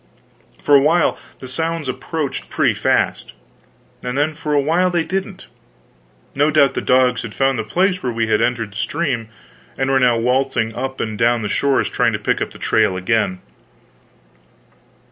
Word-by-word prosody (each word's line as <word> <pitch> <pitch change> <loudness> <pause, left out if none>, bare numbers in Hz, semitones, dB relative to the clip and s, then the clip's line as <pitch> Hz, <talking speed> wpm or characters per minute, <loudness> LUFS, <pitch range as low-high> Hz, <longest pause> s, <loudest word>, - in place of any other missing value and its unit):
For 145 - +1
a 140 - +8
while 160 +3 +3 0.2
the 130 - -10
sounds 160 +3 -3
approached 135 +3 -4
pretty - - +2
fast. - - 0 0.7
And 125 +1 -3
then 150 +2 +1
for 150 -1 -3
another 140 -1 +2
while 180 +3 +3
they 175 -2 0
didn't. 190 +2 -4 0.9
No 145 +2 +2
doubt 140 -3 +4
the - - -2
dogs 125 -1 +2
had 110 -3 -8
found 135 -2 +1
the - - -1
place 185 - 0
where 125 - -2
we 115 0 -1
had 110 0 +1
entered 115 -3 -1
the 100 - -10
stream, 120 -2 -2 0.5
and 135 0 0
were 135 - +3
now 125 -2 +3
waltzing 125 -1 0
up 130 +3 -5
and 110 -2 -4
down 120 0 +2
the - - -1
shores 140 +6 +1
trying - - +1
to - - 0
pick - - -1
up - - -1
the - - -14
trail 95 - +1
again. 95 -1 0
130 Hz, 180 wpm, -19 LUFS, 115-150 Hz, 0.9 s, a